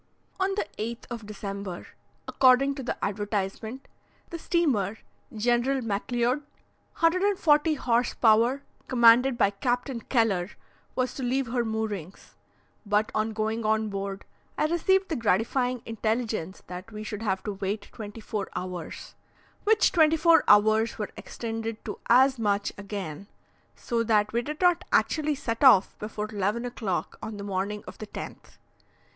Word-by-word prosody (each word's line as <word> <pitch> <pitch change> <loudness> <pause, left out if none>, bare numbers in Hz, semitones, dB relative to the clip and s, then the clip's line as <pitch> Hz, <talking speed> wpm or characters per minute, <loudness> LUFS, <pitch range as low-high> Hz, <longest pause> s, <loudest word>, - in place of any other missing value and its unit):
On 385 +1 +1
the 410 - -1
8th 230 +2 -4
of 225 -3 -6
December, 200 -3 -6 0.4
according 265 +2 +4
to 275 - -6
the 250 - -3
advertisement, 205 +4 -3 0.4
the 335 - -5
steamer 240 - +1 0.3
"General 240 +4 +1
Macleod," 240 +5 0 0.6
140 330 -3 +3
horse 240 -3 +1
power, 235 +5 +3 0.2
commanded 240 +1 +5
by 200 - +3
Captain 245 +4 -2
Kellar, 210 -7 +1 0.5
was 255 -1 0
to - - -6
leave 260 +2 0
her 240 0 0
moorings; 215 -5 -4 0.5
but 210 0 +1
on 215 +1 0
going 220 +1 -2
on 220 0 +1
board, 195 0 -5 0.3
I - - +2
received 375 +4 +2
the 320 - -1
gratifying 240 +3 0
intelligence 220 -4 -2
that 180 +5 -8
we 215 0 -7
should 210 0 -5
have 190 -4 -1
to 210 - -3
wait 200 +1 -4
twenty 215 0 -8
four 210 -2 -4
hours, 180 -2 -6 0.5
which 440 +1 +4
twenty 320 -2 +4
four 330 +1 +5
hours 215 +2 +4
were 210 -2 -4
extended 225 -1 -5
to - - -5
as 260 +1 +5
much 205 -2 0
again, 200 -4 -6 0.5
so 235 -2 -2
that 215 -2 +2
we 235 - +2
did 300 +6 -6
not 355 -1 +4
actually 305 -1 +2
set 230 -2 -3
off 225 -8 +6
before 210 0 -4
11 210 +4 -1
o'clock 215 -7 -3
on 220 -1 -6
the 200 - -6
morning 200 +1 -3
of - - -11
the 215 - -7
10th. - - -9
225 Hz, 145 wpm, -27 LUFS, 205-255 Hz, 0.6 s, off